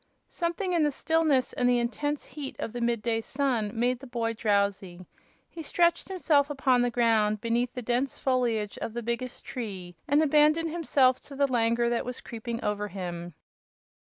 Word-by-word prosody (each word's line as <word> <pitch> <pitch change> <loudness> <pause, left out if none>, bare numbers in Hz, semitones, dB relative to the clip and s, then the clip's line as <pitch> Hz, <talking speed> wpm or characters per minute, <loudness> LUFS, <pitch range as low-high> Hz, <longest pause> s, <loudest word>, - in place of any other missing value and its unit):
Something 355 +2 -2
in 340 - +3
the 300 - +3
stillness 310 -2 +1
and 245 0 +2
the 245 - +4
intense 290 +5 -2
heat 285 -3 -7
of 225 - -5
the 240 - -4
mid 235 -2 0
day 225 -1 0
sun 255 -4 -1
made 245 +2 0
the 270 - -11
boy 230 -2 -2
drowsy. 200 -4 -1 0.4
He 330 - -9
stretched 340 +2 +1
himself 305 -6 +2
upon 265 -3 +2
the 245 - +2
ground 220 -3 +2
beneath 235 +2 0
the 250 - -4
dense 245 +4 -1
foliage 235 -5 0
of 225 - -4
the 240 0 -4
biggest 235 +2 -4
tree 190 -8 -6
and 290 +3 +4
abandoned 305 +2 +3
himself 275 -6 +3
to 280 - -11
the 280 +1 +3
languor 235 -2 +1
that 235 0 0
was 250 -1 -5
creeping 230 +1 -6
over 210 0 -1
him. 175 -3 -6
245 Hz, 180 wpm, -28 LUFS, 225-280 Hz, 0.4 s, the